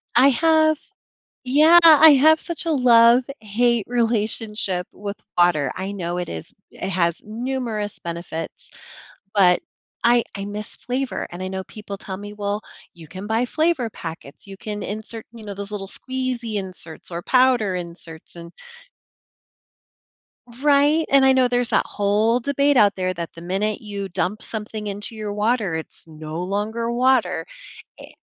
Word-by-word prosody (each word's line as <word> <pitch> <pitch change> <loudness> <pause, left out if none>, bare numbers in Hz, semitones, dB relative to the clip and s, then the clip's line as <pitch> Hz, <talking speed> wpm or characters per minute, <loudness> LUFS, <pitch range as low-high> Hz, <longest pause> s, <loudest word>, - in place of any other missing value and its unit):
I 260 +4 +7
have 315 +2 +3 0.7
Yeah, 305 +7 +6
I 315 -1 +9
have 310 +3 +5
such 340 0 -4
a 330 - 0
love-hate 240 -2 +3
relationship 220 -5 -1
with 205 0 -7 0.2
water, 155 -7 +3
I 190 +1 -4
know 175 -3 -4
it 180 - -3
is 80 -1 -7 0.2
it - - -5
has 170 -3 0
numerous 225 -2 -4
benefits, 170 - -6 0.6
but 180 -3 +4 0.4
I 240 0 +5
I 200 0 -5
miss 210 +1 -6
flavor, 255 +2 -3
and 175 - -8
I 185 - -3
know 190 0 -4
people 205 -2 -8
tell 190 -1 -7
me, 205 +1 -8
well, 205 0 -3 0.3
you 165 -3 -14
can 185 +5 -8
buy 225 +3 +1
flavor 310 -4 0
packets, 160 -6 -9
you 195 -1 -10
can 210 0 -6
insert, 220 +2 -6
you 225 -2 -12
know, 205 - -5
those 200 +1 -7
little 195 -2 -5
squeezy 255 -2 -4
inserts, 185 -5 -7
or 170 +1 -4
powder 250 -5 +3
inserts 170 -2 -9
and 170 0 -10 2.1
Right? 295 +2 +4
And, 275 -1 +6
I 265 0 +6
know 255 -1 +4
there's 245 -1 0
that 215 - +2
whole 210 +4 +1
debate 280 +2 +1
out 205 -4 +5
there 185 -1 -1
that 170 -2 -6
the 165 - -11
minute 200 +4 -1
you 200 -2 -5
dump 180 +4 -2
something 215 -1 -5
into 205 +3 -5
your 210 -2 -4
water, 210 -4 0
it's 160 0 -7
no 155 +1 -7
longer 215 +5 -2
water, 255 0 +2 0.5
it - - -14
210 Hz, 155 wpm, -22 LUFS, 190-250 Hz, 2.1 s, I